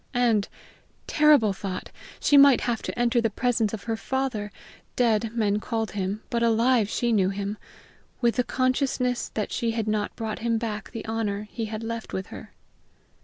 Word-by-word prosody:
And, 230 -5 +2 0.6
terrible 295 -9 +4
thought! 190 -1 -6 0.3
she 290 - +3
might 280 -2 +7
have 235 -2 -1
to - - -5
enter 240 0 +3
the 225 - +1
presence 225 -1 0
of 220 - -6
her 225 -1 -2
father 235 -4 -2 0.4
dead, 230 -2 +2
men 210 -2 +1
called 225 -1 -2
him, 200 +1 -3
but 235 - 0
alive 230 -1 +3
she 240 +1 0
knew 195 -4 +3
him 200 +1 -3 0.6
with 235 0 +1
the 250 - +3
consciousness 255 -1 0
that 215 - -2
she 235 - -1
had 225 -2 -2
not 215 -1 -1
brought 220 -2 -4
him 230 0 0
back 220 -2 -4
the 225 - -7
honor 215 -2 -2
he 230 -2 -3
had 215 +1 -5
left 230 0 -5
with 190 - -3
her. - - -10
225 Hz, 175 wpm, -26 LUFS, 210-240 Hz, 0.6 s, might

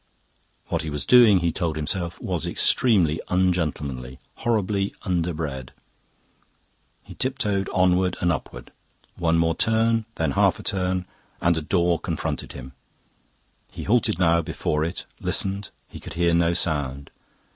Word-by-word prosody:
What - - 0
he 80 - -4
was 75 -1 -3
doing, 115 -7 +7
he 85 -1 +1
told 80 -1 -2
himself, 85 +2 -3
was - - -3
extremely 95 - +2
ungentlemanly, 75 -9 -1 0.2
horribly 105 -3 0
underbred. 80 -8 -2 1.3
He - - -11
tiptoed 105 -7 -1
onward 90 0 +2
and 85 - +2
upward. 75 - -6 0.4
One 85 -1 +1 0.2
turn 110 +1 +2
more, 110 - -6
then 80 -3 0
half - - +2
a - - -9
turn, 90 -1 -1 0.3
and 85 0 +2
a 80 - -2
door 85 +1 +1
confronted - - -3
him. 65 -1 -9 1.0
He - - -7
halted 115 -4 +2 0.3
before 75 -1 -1
it, 85 +3 -4
listened; 100 0 -1 0.2
he - - -10
could - - -9
hear 85 0 +2
no 85 0 +3
sound. 70 -5 -2
85 Hz, 135 wpm, -24 LUFS, 80-95 Hz, 1.3 s, doing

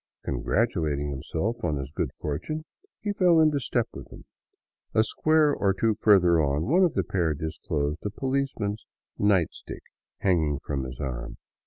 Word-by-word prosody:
Congratulating 75 - 0
himself 80 - -2
on 75 -4 0
his 70 0 -5
good - - -2
fortune, 85 - -4 0.4
he 205 -1 -1
fell 180 -4 +4
into 155 -2 +4
step 120 -2 0
with - - -9
them. - - -13 0.7
A 110 - +5
square 155 +4 +3
or 100 -1 +1
two 110 +2 +2
further 90 -6 +4
on 70 +1 0
one 175 +9 +4
of 175 - +2
the - - +2
pair 85 -5 0
disclosed 75 0 -3
a 105 - -1
policeman's 130 -3 -2 0.2
" - - -54
night 100 -5 +3
stick - - -10 0.2
" - - -68
hanging 80 -6 +2
from 70 -2 -2
his 65 -1 -8
arm. - - -5
95 Hz, 170 wpm, -26 LUFS, 75-120 Hz, 0.7 s, A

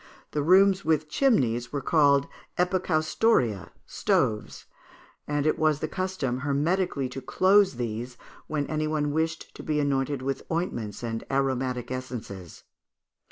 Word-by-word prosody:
The 150 - -1
rooms 190 +4 +5
with 155 -1 +1
chimneys 125 - +1
were 145 - -2
called 140 -2 +3 0.3
epicaustoria 175 - +1 0.2
(stoves), 105 -1 -1 0.6
and 145 -1 -1
it 155 - +1
was 155 -2 +2
the 155 - -2
custom 185 -9 -2
hermetically 145 +1 0
to 135 - -7
close 190 +6 +3
these 120 +1 -4 0.3
when 150 -2 -1
any 155 +1 -2
one 150 -1 0
wished 160 +1 -2
to - - -9
be 150 -1 -1
anointed 140 -1 0
with 135 0 -2
ointments 120 - -3
and 115 -1 -3
aromatic 130 -2 -1
essences. 115 -9 -7
145 Hz, 130 wpm, -26 LUFS, 130-160 Hz, 0.6 s, rooms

